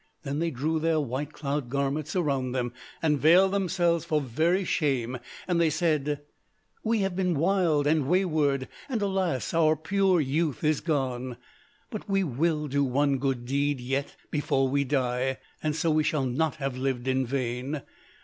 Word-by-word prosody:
Then 140 0 -2
they 170 +1 +1
drew 155 +3 -1
their 160 0 +2
white 140 +1 -3
cloud 140 -3 -3
garments 140 +4 -1
around 135 -7 0
them, 120 -2 -2 0.3
and 150 -3 +2
veiled 180 +6 +6
themselves 175 -4 +1
for 155 -2 +1
very 160 +8 +1
shame: 130 -7 0 0.3
and 175 -2 +2
they 165 - +4
said, 150 -3 0 0.6
'We 225 -1 +1
have 195 -2 -1
been 180 -2 +1
wild 165 -3 +2
and 150 -2 +2
wayward: 155 -7 +2 0.2
and 245 -4 0
alas, 185 - -1
our 160 -1 +4
pure 190 +3 +2
youth 150 +1 0
is 155 -1 +2
gone. 130 -5 -2 0.5
But 215 -2 -6
we 195 0 +2
will 150 +1 0
do 140 +1 +1
one 140 +1 +1
good 130 -3 -1
deed, 140 +2 0
yet, 135 +3 -2 0.2
before 135 -3 +1
we 140 +1 +1
die, 130 -1 0 0.2
and 155 -1 -1
so 165 0 +1
we 155 0 +3
shall 150 -3 0
not 140 +5 0
have 135 -2 -3
lived 130 -1 -2
in 130 0 +2
vain. 130 +2 -2
145 Hz, 170 wpm, -27 LUFS, 135-165 Hz, 0.6 s, veiled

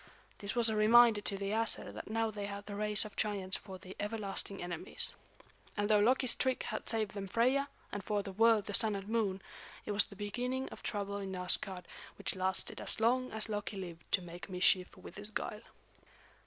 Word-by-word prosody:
This 200 +3 -4
was 235 -1 +4
a 220 - +1
reminder 220 0 +6
to 200 -1 0
the 195 0 -3
Æsir 225 +1 -1
that - - -8
now 225 0 0
they 205 -1 -4
had 200 0 -6
the 210 - -7
race 210 +1 +3
of 215 - -9
giants 200 -3 +1
for 190 -2 -9
their 185 0 -10
everlasting 205 -2 -2
enemies. 175 -2 -3 0.6
And 205 0 +1
though 210 - +6
Loki's 250 +3 +3
trick 260 -1 0
had 215 -2 -4
saved 220 -3 +1
them 195 -1 -5
Freia, 255 +7 +2 0.2
and 205 - -4
for 205 0 -1
the 195 - -6
world 220 +1 +4
the 205 - -5
Sun 215 0 +6
and 195 0 -6
Moon, 210 -4 0 0.4
it - - -3
was 205 0 +3
the 200 - -13
beginning 250 +6 -3
of - - -11
trouble 200 -1 -2
in 195 -1 -4
Asgard 180 0 0 0.3
which - - -1
lasted 185 0 0
as - - -3
long 255 +3 +2
as 220 0 0
Loki 210 -1 -3
lived 170 -3 -8
to 185 - +3
make 175 +2 -9
mischief 180 0 +3
with - - -11
his 205 +1 0
guile. 210 0 -4
205 Hz, 205 wpm, -34 LUFS, 195-225 Hz, 0.6 s, reminder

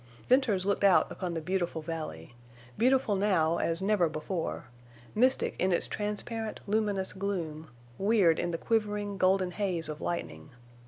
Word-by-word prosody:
Venters 240 -8 +3
looked 200 0 0
out 195 -2 +5
upon 180 -3 -4
the 165 - -2
beautiful 175 -2 -2
valley—beautiful 155 - -2
now 185 -5 +2
as 165 +2 -1
never 195 -5 +3
before—mystic 155 - -2
in 185 - +2
its 175 - +2
transparent, 215 +2 -3
luminous 205 -2 0
gloom, 170 -6 -4 0.3
weird 195 -5 +4
in 175 - -1
the 170 - -2
quivering, 210 -1 -1
golden 185 0 +3
haze 180 -4 -1
of 155 0 -6
lightning. 170 -3 -4
185 Hz, 130 wpm, -30 LUFS, 165-205 Hz, 0.3 s, out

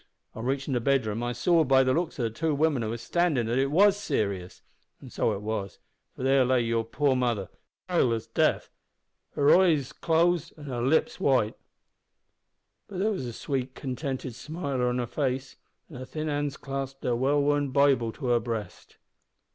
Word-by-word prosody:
On 110 - -7
reachin' 135 +2 -1
the 125 - +1
bedroom 115 -4 +1
I 120 0 -1
saw 160 +8 +3
by 135 -2 +4
the 130 0 +2
looks 165 -2 -2
o' 120 - +1
two 150 +7 -1
women 150 -3 +1
who 110 - -2
were 115 - -3
standin' 155 -2 0
there 115 +2 -1
that 130 - +3
it 135 - 0
was 195 +6 +5
serious. 100 - -3 0.4
And - - -12
so - - +1
it 100 - -6
was, 105 -3 -4 0.4
for - - -7
there 135 0 +4
lay 125 0 +2
your 115 -1 0
poor 135 +4 +1
mother, 120 -6 -1 0.4
as 180 - -3
pale 125 - +3
as 115 - -3
death; - - +1 0.7
her 145 0 +5
eyes 160 -8 +3
closed 170 0 +1
and 150 - -10
her 125 -4 -4
lips 135 +6 +1
white; 125 -6 +2 1.3
but 195 - -8
there 210 +4 +1
was 135 -12 -3
a - - -4
sweet, 130 +1 -3
contented 130 -1 -4
smile 140 +1 -4
on 125 0 +1
her 125 - -1
face, 130 +1 -3 0.3
and 135 -7 -10
her 130 - -6
thin 155 +3 -4
hands 145 -1 -2
clasped 135 -1 -5
her 120 - +1
well 135 +4 +2
worn 145 0 +1
Bible 130 -4 +3
to 145 - -8
her 120 -1 +4
breast." 110 -5 -6
135 Hz, 195 wpm, -27 LUFS, 120-145 Hz, 1.3 s, was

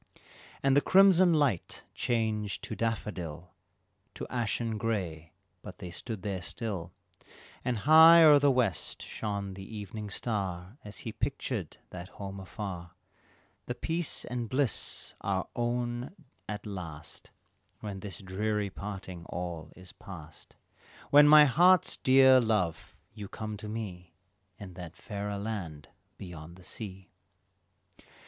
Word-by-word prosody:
And 135 -1 +4
the 145 - +6
crimson 185 -1 +6
light 145 - +1
changed 110 -5 -1
to 110 - -5
daffodil 90 -7 -4 0.6
To - - -5
ashen 115 -2 -1
gray, 90 -8 -2 0.3
but - - -10
they 90 - -7
stood 105 +2 -6
there 95 -3 -3
still, 90 -3 -5 0.7
And 125 -2 0
high 160 +7 +8
o'er 150 -2 +8
the 145 0 +4
west 115 - 0
shone 100 -2 -4
the 95 +3 -8
evening 105 +1 -6
star 100 - -3
As 105 0 -10
still - - -9
he - - -4
pictured 120 - -3
that 90 +1 -8
home 100 -1 -6
afar 90 -2 -7 0.7
"The 125 - -3
peace 165 +5 -2
and 120 -1 -3
the - - -8
bliss 130 +2 -2
our - - -1
own 120 +5 -2 0.3
at 105 0 -5
last 85 -7 -8 0.5
When 100 -2 -5
this 95 -3 -6
dreary 105 +2 -1
parting 95 -4 -7
all 85 -3 -5
is 90 -1 -10
past, 80 -5 -12 0.6
When 145 +1 +8
my 150 0 +9
heart's 175 +6 +5
dear 130 0 +7
love, 105 -8 -1 0.2
you 105 -2 -7
come 110 +1 -5
to 105 +1 -7
me 90 -6 -6 0.4
In 95 -3 -9
that 85 -2 -9
fairer 100 0 -5
land 95 -9 -5 0.3
beyond 85 -2 -9
the 90 - -16
sea." 95 -1 -7
105 Hz, 135 wpm, -30 LUFS, 90-120 Hz, 0.7 s, my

